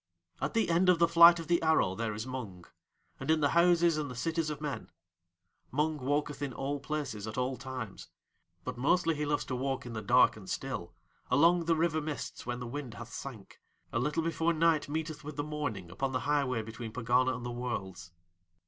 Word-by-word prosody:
At - - -2
the 225 -6 +2
end 180 +2 +4
of 180 - +6
the 170 0 +4
flight 170 +1 +8
of 165 - -5
the 170 +1 +2
arrow 160 - +3
there 110 +1 -3
is 110 +2 -4
Mung, 110 -9 -6 0.5
and - - -6
in 160 0 +4
the 145 -2 +3
houses 170 -1 +4
and 145 -2 -3
the 125 - -7
cities 165 +5 -1
of 150 -1 -4
Men. 150 -2 -4 0.8
Mung 150 +2 0
walketh 145 +2 -1
in 140 -3 -3
all 140 +3 -3
places 140 -8 -4
at 110 - -6
all 130 +1 0
times. 130 -6 -7 0.6
But - - -5
mostly 165 +5 +3
he 150 -1 -2
loves 145 0 0
to 130 - -3
walk 135 +1 -2
in 120 - -6
the 110 - -4
dark 125 +5 +5
and 100 -3 -11
still, 90 -10 -4 0.3
along 170 +6 +4
the 165 0 +3
river 160 -1 +1
mists 150 -5 -5
when 120 0 -2
the 125 - -5
wind 125 -2 -6
hath 120 +2 -9
sank, 115 -8 -9 0.3
a 115 - +1
little 150 +6 0
before 165 +1 +1
night 160 -2 +2
meeteth 155 0 -3
with 150 0 -7
the 145 - -2
morning 145 - -4
upon 135 +8 -2
the 130 - 0
highway 140 -5 +1
between 115 +1 -7
Pegana 125 +2 +2
and 120 0 -7
the 120 - -3
Worlds. 95 -8 -5
140 Hz, 210 wpm, -31 LUFS, 120-160 Hz, 0.8 s, flight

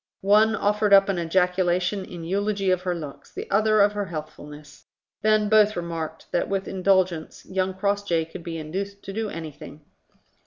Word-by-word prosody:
One 215 +2 +5
offered 210 0 +1
up 195 0 +7
an 190 -3 0
ejaculation 180 +2 +1
in 175 -3 -9
eulogy 195 +2 0
of 185 -1 +1
her 180 -1 -2
looks, 150 -4 -9
the - - -7
other 215 +1 +4
of 205 0 +5
her 205 -1 -3
healthfulness: 150 -3 -9 0.3
then 215 -1 +3
both 215 0 +4
remarked 165 -2 -5
that 175 - 0
with 195 -1 -2
indulgence 185 -4 0
young 185 0 -2
Crossjay 200 -4 0
could 165 +2 -10
be 165 -1 -5
induced 195 +6 -5
to 195 - -7
do 220 +1 -2
anything. 155 -3 -9
190 Hz, 165 wpm, -24 LUFS, 170-205 Hz, 0.3 s, up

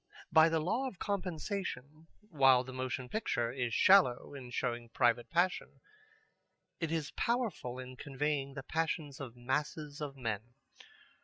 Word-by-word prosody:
By 160 0 +7
the 165 0 +1
law 225 - 0
of 210 - -8
compensation, 175 -6 -4
while 135 -11 +4
the 130 0 -9
motion 130 0 -3
picture 120 - -1
is 125 -2 -2
shallow 185 -11 +5
in 130 -3 -8
showing 120 -1 -2
private 120 -1 +2
passion, 175 +5 0 1.0
it 165 -2 -2
is 160 -4 -1
powerful 230 - -1
in 130 0 -8
conveying 140 0 -2
the 135 - -5
passions 155 -2 -2
of 130 -4 -7
masses 145 +4 -3
of 140 -2 -5
men. 115 -1 -4
140 Hz, 140 wpm, -33 LUFS, 125-165 Hz, 1.0 s, By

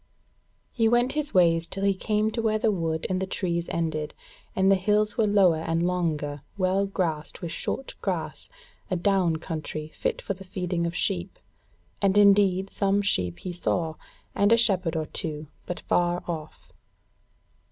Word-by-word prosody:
He 225 -2 +2
went 240 +2 +3
his 300 -1 -2
ways 170 -3 +3
till 195 - -4
he 200 0 +4
came 210 +3 0
to 230 - -2
where 220 -1 +1
the 215 0 +2
wood 165 -4 -2
and 185 0 -1
the 190 - -2
trees 170 -3 -1
ended, 155 -2 -2 0.4
and 190 +1 +4
the - - +6
hills 210 +2 +1
were 225 -3 +2
lower 195 -5 +4
and 165 +1 0
longer, 155 -5 -1 0.2
well 190 +1 +1
grassed 165 -6 -3
with 170 - -3
short 270 - -3
grass, - - -3 0.4
a 185 - 0
down 180 -2 +2
country 155 -2 -5
fit - - -2
for 195 - -3
the 190 0 -11
feeding 180 -3 -2
of 170 - -5
sheep; 185 0 -1 0.6
and 200 0 +3
indeed 195 -2 +5
some 200 0 +1
sheep 90 - +1
he 180 - -6
saw, 170 -2 -1 0.4
and 200 +2 +3
a 230 - +7
shepherd 185 -7 +2
or 160 -1 -1
two, 150 -1 -5 0.2
but 180 - -4
far 175 0 +1
off. 160 -3 -7
185 Hz, 170 wpm, -26 LUFS, 165-200 Hz, 0.6 s, a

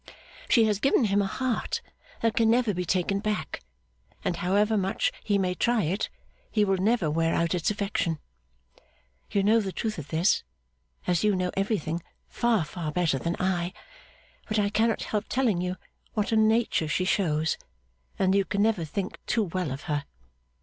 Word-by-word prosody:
She 230 - +6
has 210 -2 +1
given 275 +1 +3
him 205 -1 +3
a 195 - 0
heart 250 +3 -1 0.4
that 230 -1 +2
can 230 -3 +4
never 235 -2 +3
be 180 0 -2
taken 190 +3 +1
back; 210 +1 -3 0.6
and 175 - 0
however 205 +5 +2
much 195 -1 +1
he 205 -2 +2
may 185 -2 +1
try 235 +3 +1
it, 185 +7 -1 0.4
he 210 -2 +2
will 195 -1 +2
never 210 -2 +2
wear 165 +1 +1
out 170 +1 +1
its 175 -2 +1
affection. 200 -5 -1 1.1
You 200 - +1
know 220 +3 +5
the 195 -3 -2
truth 215 -1 -3
of 145 - -7
this, 165 +6 +2 0.6
as 175 0 +1
you 210 -2 +3
know 180 -1 0
everything, 195 -5 -1 0.3
far 230 -8 +1
far 155 0 -4
better 160 -5 +1
than 170 +4 -1
I; 180 -1 0 0.7
but 215 - -1
I 205 -1 +2
cannot 225 +1 +2
help 210 0 -2
telling 235 -9 +1
you 180 0 -2 0.4
what 210 -1 0
a - - +3
nature 220 -6 +3
she 155 +5 0
shows, 160 -5 +1 0.6
and 190 0 +3
that - - +4
you 195 - +1
can 200 +3 0
never 215 -6 +2
think 185 +5 -4
too 225 - +2
well 180 -3 -2
of 135 +2 -5
her. 145 -2 -2
195 Hz, 180 wpm, -27 LUFS, 175-215 Hz, 1.1 s, She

